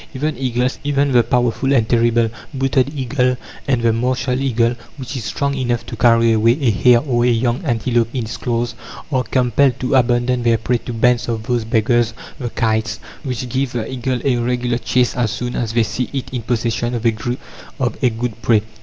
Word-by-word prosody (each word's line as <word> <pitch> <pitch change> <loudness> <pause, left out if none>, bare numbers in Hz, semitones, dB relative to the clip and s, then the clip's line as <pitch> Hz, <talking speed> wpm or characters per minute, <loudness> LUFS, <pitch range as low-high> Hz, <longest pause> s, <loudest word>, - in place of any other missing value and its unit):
Even 150 +3 -1
eagles 125 0 -1
even 140 -1 +1
the 125 -2 +5
powerful 125 +3 +1
and 115 -5 +3
terrible 115 -1 +2 0.2
booted 135 0 +1
eagle, 125 -1 +1 0.3
and 125 -4 +1
the 115 -1 +3
martial 125 +2 0
eagle, 120 -3 +2 0.2
which 130 +1 -6
is 120 -5 -4
strong 140 +5 -1
enough 120 -3 -1
to - - -7
carry 115 0 +4
away 115 +3 +3
a 130 -6 +2
hare 120 +3 +4
or 120 -5 0
a - - +3
young 120 +4 0
antelope 120 -3 +1
in 125 -2 -2
its 110 - -5
claws 120 -1 -1 0.4
are 130 -2 +2
compelled 125 +1 +2
to 130 - -1
abandon 125 -1 +2
their 115 -1 +3
prey 120 +2 0
to 125 - -7
bands 120 +1 +2
of 110 -2 -2
those 120 0 0
beggars 115 +1 +1 0.2
the 125 -3 -3
kites, 110 -4 -1 0.2
which 130 -1 -4
give 130 +1 -1
the 115 -2 -2
eagle 130 0 -2
a 130 -3 +2
regular 120 0 0
chase 125 0 +1
as 120 -3 +1
soon 120 +4 -4
as 110 -2 -2
they 115 -1 +3
see 120 +3 -3
it 135 -2 -4
in 125 - -2
possession 120 +1 -1
of 115 0 -4
a 120 +2 -2
good 115 -1 -4
prey. 110 -1 +3
120 Hz, 195 wpm, -19 LUFS, 115-130 Hz, 0.4 s, the